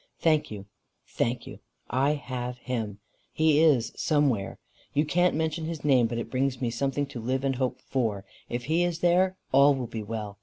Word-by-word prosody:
"Thank 155 -2 +2
you. 100 -2 -7 0.4
Thank 120 +1 -2
you. - - -10 0.3
I 135 +4 +2
have 125 -3 -5
him. 115 -5 -4 0.3
He 155 -1 +3
is 140 -8 +3
somewhere. 140 -10 +1 0.4
You 150 +2 +3
can't 175 +2 +2
mention 160 +1 -1
his 160 -2 -5
name 130 -5 +4
but 115 +1 -4
it 115 - -5
brings 130 -1 0
me 120 -3 -1
something 135 +4 -1
to 135 -3 -8
live 130 +3 -1
and 135 -2 0
hope 130 -1 -1
for. 110 -7 -2 0.2
If 120 0 -3
he 165 +4 +2
is 175 -1 -2
there, 185 +2 +3
all 140 +1 +6
will 130 -2 -3
be 115 -1 -5
well. 105 -1 -6
135 Hz, 190 wpm, -27 LUFS, 120-155 Hz, 0.4 s, all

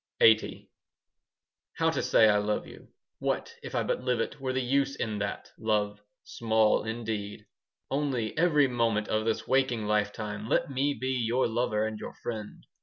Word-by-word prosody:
LXXX 110 -1 +4 1.1
How - - +1
to - - -1
say 110 - +5
I 105 -1 +4
love 105 +1 -1
you: - - -13 0.3
What, - - -2
if - - -7
I - - +1
but - - -1
live 125 -2 0
it, 125 +5 -3
Were 130 -1 -1
the 130 - 0
use 135 +2 +1
in 110 -2 -3
that, 105 0 -4
love? 105 -1 0 0.2
Small, 110 -2 +2
indeed. 110 -2 -4 0.5
Only, 135 -6 -1
every 150 -4 +4
moment 115 -4 0
5 110 - +2
Of 110 - -2
this 115 -1 -1
waking 130 -4 +1
lifetime 105 0 -1
Let - - +1
me 140 +2 0
be 130 +1 -2
your 125 0 +1
lover 110 -2 0
And 110 -1 -4
your - - -7
friend! 110 -3 -6
115 Hz, 175 wpm, -29 LUFS, 105-130 Hz, 1.1 s, say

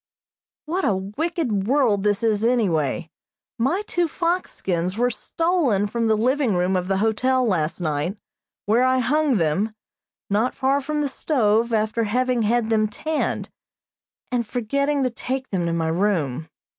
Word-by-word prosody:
What 355 +5 -2
a 205 - +2
wicked 210 - -2
world 245 -7 +3
this 205 +2 0
is 220 -2 +1
anyway! 170 - +1 0.5
My 290 - +1
two 350 -4 0
fox 345 +3 -1
skins 180 +1 -2
were 245 +1 +2
stolen 310 - 0
from 230 +2 -1
the 220 -1 +3
living 250 -1 +1
room 180 +2 +1
of 180 0 -1
the 195 0 +1
hotel 250 +5 +2
last 170 -7 0
night, 160 +4 -2 0.5
where 225 +4 +3
I 255 0 +3
hung 280 +3 +2
them, 185 +7 0 0.5
not 215 +5 0
far 275 +1 +1
from 300 +2 -2
the 290 - 0
stove, 235 -5 +1
after 220 +1 +1
having 250 +2 +1
had 225 +1 +1
them 215 -1 +3
tanned, 310 +9 -2 0.8
and 245 -1 +1
forgetting 280 +5 0
to 255 - 0
take 260 +2 -4
them 180 -3 0
to 165 - -1
my 165 -1 0
room. 160 -5 0
225 Hz, 155 wpm, -23 LUFS, 195-265 Hz, 0.8 s, world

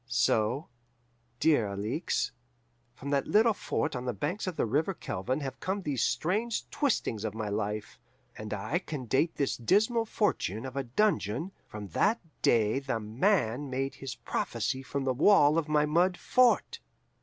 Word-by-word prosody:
"So, 120 +3 +1 0.7
dear 145 -9 +3
Alixe, 105 - -2 0.6
from 140 +3 -6
that 140 -1 +1
little 220 +1 +4
fort 160 -6 -2
on 125 0 -4
the 125 - -1
banks 170 - -3
of 185 - -2
the - - +1
river 150 - 0
Kelvin 130 - -3
have 135 -2 -5
come 195 +1 -2
these 140 -6 -1
strange 210 +7 0
twistings 215 - 0
of 110 -1 -3
my 110 -2 -3
life, 105 +1 -3 0.4
and 110 0 -7
I 110 - -1
can 150 -8 -6
date 135 +8 +1
this 140 - 0
dismal 220 - +2
fortune 155 - -1
of 130 0 -7
a 140 - 0
dungeon 155 - 0 0.2
from 105 -2 -8
that 210 - +2 0.2
day 110 +2 +3
The 135 -4 -2
Man 125 - +1
made 135 +1 -2
his 135 -1 -7
prophecy 120 +2 -2
from 140 +1 -3
the 130 -1 +1
wall 150 +1 +5
of 155 -2 -4
my 150 -1 +3
mud 175 +4 +2
fort. 250 -2 +3
135 Hz, 165 wpm, -29 LUFS, 115-180 Hz, 0.7 s, wall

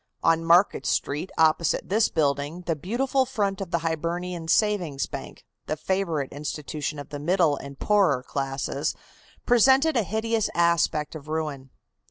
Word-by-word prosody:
On 165 0 +3
Market 175 +4 +4
Street 150 +6 -1
opposite 160 0 +2
this 215 +3 +3
building 145 +2 -1
the 170 -2 -1
beautiful 255 - 0
front 205 -7 -2
of 190 - -4
the 170 - +1
Hibernian 170 +1 -3
Savings 175 -8 +1
Bank, - - -9 0.2
the 155 - -2
favorite 170 -6 -1
institution 150 +1 -4
of 145 - -8
the 145 - -6
middle 165 -1 +2
and 140 0 -9
poorer 185 -12 +2
classes, 135 +2 -2 0.5
presented 265 +6 +4
a 235 - +3
hideous 220 +1 -1
aspect 170 -3 +2
of 155 -2 -9
ruin. 150 -4 -4
165 Hz, 145 wpm, -25 LUFS, 150-195 Hz, 0.5 s, Market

